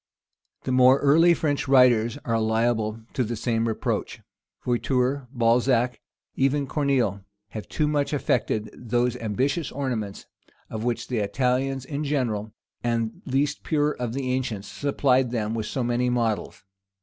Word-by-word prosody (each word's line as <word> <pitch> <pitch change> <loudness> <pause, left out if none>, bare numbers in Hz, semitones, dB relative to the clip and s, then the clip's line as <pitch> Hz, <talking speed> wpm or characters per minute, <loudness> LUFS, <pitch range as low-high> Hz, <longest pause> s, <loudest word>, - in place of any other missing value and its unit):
The - - -2
more 130 +1 +6
early 165 +5 +5
French 145 -3 -1
writers 125 -2 +4
are 115 -2 +1
liable 110 0 0
to 130 - +1
the 120 +1 -3
same 115 0 0
reproach. 110 - -2 0.5
Voiture, 125 +2 0
Balzac, 120 0 +2 0.3
even 140 +2 +1
Coraeneille, 130 - 0 0.3
have 110 0 -8
too 150 - 0
much 145 -1 0
affected 115 -6 0
those 120 +1 -1
ambitious 130 - -1
ornaments, 120 -8 -4 0.5
of 110 0 -4
which 120 -1 -2
the 125 -3 -1
Italians 130 +4 0
in 145 +1 -4
general, 120 -8 -1 0.3
and 115 -1 -1
the - - -5
least 140 +2 0
pure 150 -1 +1
of 125 -5 -4
the 130 -1 -2
ancients, 120 -6 -2
supplied 135 -3 +1
them 110 -2 -2
with 110 -2 -3
so 130 - -2
many 120 +1 +1
models. 115 -5 -1
125 Hz, 145 wpm, -25 LUFS, 115-135 Hz, 0.5 s, more